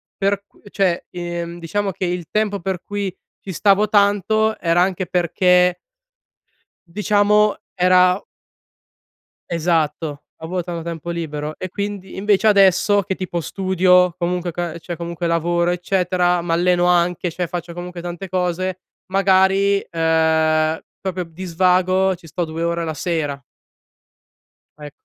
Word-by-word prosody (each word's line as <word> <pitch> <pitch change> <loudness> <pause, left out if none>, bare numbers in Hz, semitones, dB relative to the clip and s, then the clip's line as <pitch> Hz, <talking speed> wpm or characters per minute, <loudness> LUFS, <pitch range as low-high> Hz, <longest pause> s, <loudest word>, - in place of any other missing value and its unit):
per 200 0 0
qu - - -27
cioè, 190 -4 0
ehm, 175 -1 -5
diciamo 195 +4 -2
che 185 +1 -4
il 175 -2 -3
tempo 210 -2 0
per 185 0 -3
cui 200 -3 -4 0.3
ci 195 - -5
stavo 200 +3 +3
tanto 205 +1 +2
era 170 0 +1
anche 185 0 0
perché 180 0 +2 1.1
diciamo 210 +1 +3 0.2
era 180 +1 +4 1.3
Esatto, 160 -3 -1 0.2
avo 180 +2 -3
tanto 170 -1 -5
tempo 170 -1 -6
libero 155 -3 -4
e 185 - -6
quindi 200 -1 -5
invece 205 +1 +3
adesso, 200 0 +4
che 190 0 -3
tipo 180 -2 -4
studio 180 0 +3
comunque, 175 0 -1
ca 170 -1 -4
cioè, 175 +1 -6
comunque 170 0 -4
lavoro 170 +1 +1
eccetera, 180 0 +1
m'alleno 175 +1 +2
anche 175 0 +2
cioè, 180 +2 -3
faccio 175 0 -6
comunque, 175 0 -7
tante 175 +2 -6
cose, 185 0 -2 0.3
magari, 195 +1 +3
ehm, 160 -1 +2 0.2
proprio 185 -1 -3
di 165 +3 -9
svago 185 +2 +2
ci 175 -1 -15
sto 170 +3 -3
2 160 +1 -5
ore 170 0 -1
la 160 - -3
sera. 150 -3 -3 1.4
Ecc 150 -1 -9
180 Hz, 130 wpm, -20 LUFS, 170-190 Hz, 1.4 s, era